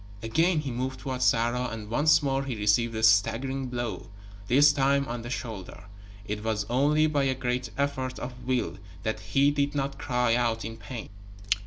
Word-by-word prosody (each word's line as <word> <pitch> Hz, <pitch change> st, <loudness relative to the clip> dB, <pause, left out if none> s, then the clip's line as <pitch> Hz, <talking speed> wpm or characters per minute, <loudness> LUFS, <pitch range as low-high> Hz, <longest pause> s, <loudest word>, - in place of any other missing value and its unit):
Again 160 Hz, +8 st, +2 dB
he 140 Hz, -3 st, -4 dB
moved 130 Hz, +2 st, -3 dB
toward 130 Hz, -2 st, -4 dB
Sarah, 120 Hz, 0 st, +2 dB
and 110 Hz, -2 st, -6 dB
once 150 Hz, +7 st, +4 dB
more 135 Hz, -1 st, 0 dB
he 130 Hz, -3 st, -3 dB
received 110 Hz, +2 st, +2 dB
a 110 Hz, -, -3 dB
staggering 115 Hz, +5 st, +3 dB
blow 120 Hz, -2 st, -4 dB, 0.4 s
this 145 Hz, +5 st, +6 dB
time 140 Hz, 0 st, +2 dB
on 120 Hz, 0 st, -4 dB
the 120 Hz, -, -7 dB
shoulder. 115 Hz, -6 st, -6 dB, 0.4 s
It 105 Hz, 0 st, -4 dB
was 110 Hz, -2 st, -1 dB
only 150 Hz, +5 st, +3 dB
by 145 Hz, -3 st, +1 dB
a 130 Hz, -1 st, +1 dB
great 125 Hz, -1 st, -2 dB
effort 130 Hz, -2 st, -1 dB
of 125 Hz, -, -5 dB
will 120 Hz, -8 st, -1 dB, 0.2 s
that 110 Hz, -, -2 dB
he 140 Hz, +1 st, +2 dB
did 145 Hz, 0 st, -1 dB
not 135 Hz, 0 st, -2 dB
cry 125 Hz, -4 st, +1 dB
out 115 Hz, -2 st, 0 dB
in 115 Hz, 0 st, -6 dB
pain. 115 Hz, +2 st, -8 dB
125 Hz, 180 wpm, -27 LUFS, 115-135 Hz, 0.4 s, this